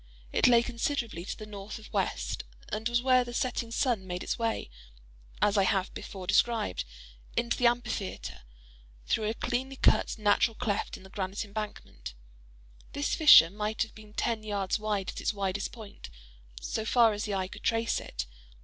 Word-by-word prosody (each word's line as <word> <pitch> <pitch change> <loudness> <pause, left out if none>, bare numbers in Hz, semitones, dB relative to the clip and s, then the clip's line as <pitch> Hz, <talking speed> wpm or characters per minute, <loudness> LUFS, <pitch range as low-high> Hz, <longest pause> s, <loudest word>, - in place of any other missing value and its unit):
It - - +5
lay 235 -1 +6
considerably 235 - -2
to - - -5
the 215 - -8
north 205 0 -7
of 220 0 -13
west, 120 - -1 0.3
and 220 +2 -2
was 240 0 +1
where 255 -1 +5
the 240 0 -7
setting 240 -2 -1
sun 230 -5 0
made 180 0 -4
its - - -2
way, 230 -1 -1 0.8
as 205 0 +4
I - - +5
have 190 0 +1
before 190 -2 -7
described, 225 - +2 0.5
into 235 0 +1
the 245 - +4
amphitheatre, 235 -5 -2 0.6
through 215 -1 +1
a 225 - -2
cleanly 260 +4 -2
cut - - +3
natural 215 +1 +3
cleft 215 -5 -2
in - - -15
the 190 - -14
granite 195 +2 -3
embankment; 200 - -7 0.8
this 285 +1 -1
fissure 295 - +9
might 210 +2 -1
have 225 - -10
been 215 -1 -14
ten 230 -2 0
yards 205 -1 -1
wide 210 -3 -1
at - - -5
its 220 - 0
widest 200 0 -2
point, 215 - -10 0.5
so 220 - -3
far 225 0 +4
as 205 +1 -3
the 205 -2 -2
eye 190 -1 -1
could - - -11
trace 230 0 +1
it. - - -5
215 Hz, 175 wpm, -29 LUFS, 195-235 Hz, 0.8 s, fissure